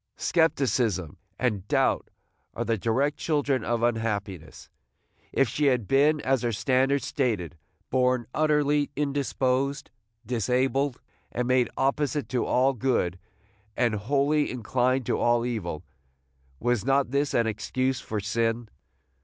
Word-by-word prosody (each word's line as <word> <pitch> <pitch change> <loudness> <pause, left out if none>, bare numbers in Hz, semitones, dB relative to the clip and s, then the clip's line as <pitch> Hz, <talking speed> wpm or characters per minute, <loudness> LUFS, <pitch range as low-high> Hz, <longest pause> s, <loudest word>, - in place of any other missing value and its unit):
Scepticism 125 - +1 0.2
and 105 -6 -1
doubt - - +1 0.5
are - - -2
the 115 - +1
direct 130 +8 0
children 145 -6 0
of 120 0 -1
unhappiness. 100 -8 -2 0.6
If 135 - +2
she 145 +7 -1
had 125 -6 +1
been, 145 +3 +3
as 130 -2 +1
her 120 - 0
standards 130 +5 +1
stated, 110 - -1 0.4
born 125 -2 +2
"utterly 150 -1 +2
indisposed, 140 -1 -1 0.3
disabled, 130 +3 0 0.3
and 125 0 -2
made 125 -2 +3
opposite 145 +2 0
to 125 - 0
all 130 +2 +2
good, 110 -8 0 0.6
and 120 -3 +2
wholly 140 +7 +1
inclined 125 +1 0
to - - 0
all 120 0 +2
evil," 90 -9 -3 0.8
was 120 -3 0
not 135 0 +2
this 140 +1 0
an 115 - +3
excuse 130 +4 -1
for 110 - -3
sin? 115 +2 -1
125 Hz, 125 wpm, -26 LUFS, 115-140 Hz, 0.8 s, been